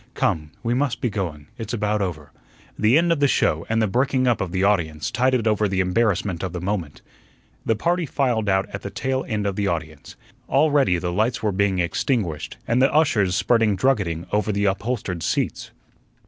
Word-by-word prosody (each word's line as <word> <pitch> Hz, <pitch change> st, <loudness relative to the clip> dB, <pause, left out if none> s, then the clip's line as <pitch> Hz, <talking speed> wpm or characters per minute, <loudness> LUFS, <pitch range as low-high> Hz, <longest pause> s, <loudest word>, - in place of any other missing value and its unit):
"Come, 75 Hz, -1 st, 0 dB
we 120 Hz, 0 st, 0 dB
must 135 Hz, 0 st, 0 dB
be 120 Hz, -4 st, -1 dB
going. 85 Hz, -8 st, -4 dB
It's 115 Hz, +1 st, -5 dB
about 105 Hz, -1 st, 0 dB
over." 80 Hz, -6 st, -4 dB, 0.4 s
The 110 Hz, +6 st, +4 dB
end 170 Hz, +1 st, +3 dB
of 165 Hz, -, +1 dB
the 145 Hz, -, +4 dB
show 80 Hz, -, +1 dB
and 115 Hz, 0 st, +1 dB
the -, -, +2 dB
breaking 130 Hz, +4 st, +1 dB
up 120 Hz, -2 st, +2 dB
of 90 Hz, -3 st, -3 dB
the 95 Hz, +1 st, 0 dB
audience 80 Hz, -7 st, 0 dB
tided 130 Hz, -2 st, +1 dB
over 105 Hz, -1 st, +2 dB
the 95 Hz, -1 st, -1 dB
embarrassment 95 Hz, -2 st, +1 dB
of 95 Hz, -3 st, -4 dB
the 90 Hz, -, -3 dB
moment. 90 Hz, -5 st, -4 dB, 0.6 s
The 115 Hz, -, +3 dB
party 170 Hz, -, 0 dB
filed 120 Hz, -8 st, 0 dB
out 95 Hz, 0 st, +2 dB
at 100 Hz, -, -5 dB
the 100 Hz, -, -5 dB
tail 130 Hz, +6 st, -2 dB
end 105 Hz, -2 st, -2 dB
of 100 Hz, -2 st, -1 dB
the 100 Hz, -1 st, 0 dB
audience. 80 Hz, -3 st, -5 dB, 0.3 s
Already 140 Hz, -, +3 dB
the 85 Hz, 0 st, -3 dB
lights 110 Hz, +6 st, 0 dB
were 105 Hz, -, +2 dB
being 95 Hz, 0 st, +1 dB
extinguished 90 Hz, -, -1 dB
and 120 Hz, +2 st, +2 dB
the 135 Hz, -, +4 dB
ushers 105 Hz, -, +2 dB
spreading 115 Hz, -1 st, +2 dB
druggeting 95 Hz, -8 st, 0 dB
over 105 Hz, +1 st, +1 dB
the 100 Hz, 0 st, 0 dB
upholstered 100 Hz, -3 st, -2 dB
seats. -, -, -2 dB
105 Hz, 195 wpm, -23 LUFS, 90-120 Hz, 0.6 s, The